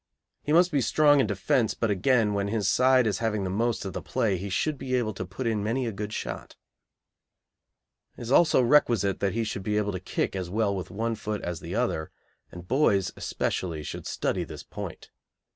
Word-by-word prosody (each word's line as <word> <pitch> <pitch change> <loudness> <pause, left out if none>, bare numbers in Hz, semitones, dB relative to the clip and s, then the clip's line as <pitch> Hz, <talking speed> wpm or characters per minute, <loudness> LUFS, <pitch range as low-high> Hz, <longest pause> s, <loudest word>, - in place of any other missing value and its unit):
He 150 - -3
must 175 +3 +5
be 145 -3 +2
strong 145 +3 +4
in 135 - +3
defence, 130 -7 +1
but 115 -2 0
again, 105 +2 +2
when 100 0 -1
his 105 -2 -1
side 130 +3 +4
is 105 - 0
having 110 -3 -1
the 95 - -2
most 115 +2 0
of 95 - -5
the - - -4
play 105 -4 0
he 95 +3 -5
should 145 - -1
be 130 -1 -2
able 115 -4 0
to 95 -1 -6
put 100 +8 -6
in 110 -3 0
many 120 +4 -1
a 115 - -2
good 105 +1 -5
shot. - - -6 1.6
It - - -7
is 120 - -5
also 155 -2 +5
requisite 115 -7 +3
that 100 - 0
he 115 +1 0
should 105 -3 -4
be 105 +2 -1
able 105 -1 0
to 95 - -4
kick 95 - -2
as 90 -2 -3
well 100 0 0
with 95 - -5
one 115 +3 -2
foot 105 -1 -4
as 85 -2 -3
the - - -6
other, 80 0 -1 0.4
and 90 0 -10
boys 100 - +2
especially 80 -4 -3
should - - -6
study - - -1
this - - -9
point. - - -8
110 Hz, 210 wpm, -27 LUFS, 100-125 Hz, 1.6 s, must